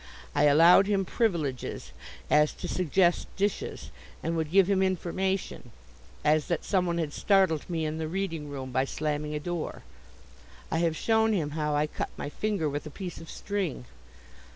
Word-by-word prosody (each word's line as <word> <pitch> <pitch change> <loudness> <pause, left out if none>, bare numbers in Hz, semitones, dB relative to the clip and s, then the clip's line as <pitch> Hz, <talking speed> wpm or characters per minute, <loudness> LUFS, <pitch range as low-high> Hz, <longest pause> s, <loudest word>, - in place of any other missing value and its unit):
I - - +3
allowed 165 +6 +7
him 200 -2 +1
privileges, 165 - -2 0.4
as 150 0 +4
to - - -6
suggest 175 0 +2
dishes, 205 +1 -2 0.3
and 165 +1 -1
would 160 -2 -1
give 190 +2 +5
him 195 -1 +2
information, 185 -4 -1 0.6
as 155 0 +3
that 170 -3 -2
someone 180 -3 +1
had 155 -3 -2
startled 190 -7 +2
me 165 -2 -1
in 155 +1 -3
the 160 - -2
reading 165 -4 -3
room 135 -2 -6
by 130 +1 +2
slamming 150 +1 -2
a - - -1
door. 175 +1 -4 0.9
I 160 - +1
have 165 -2 +1
shown 220 -1 +2
him 155 -7 -1
how 150 -1 -1
I 150 +1 +2
cut 150 - -4
my - - -4
finger 200 -1 -1
with 145 +1 -3
a - - -6
piece 180 +3 -7
of 165 - -11
string. 190 -11 -3
165 Hz, 170 wpm, -28 LUFS, 150-190 Hz, 0.9 s, allowed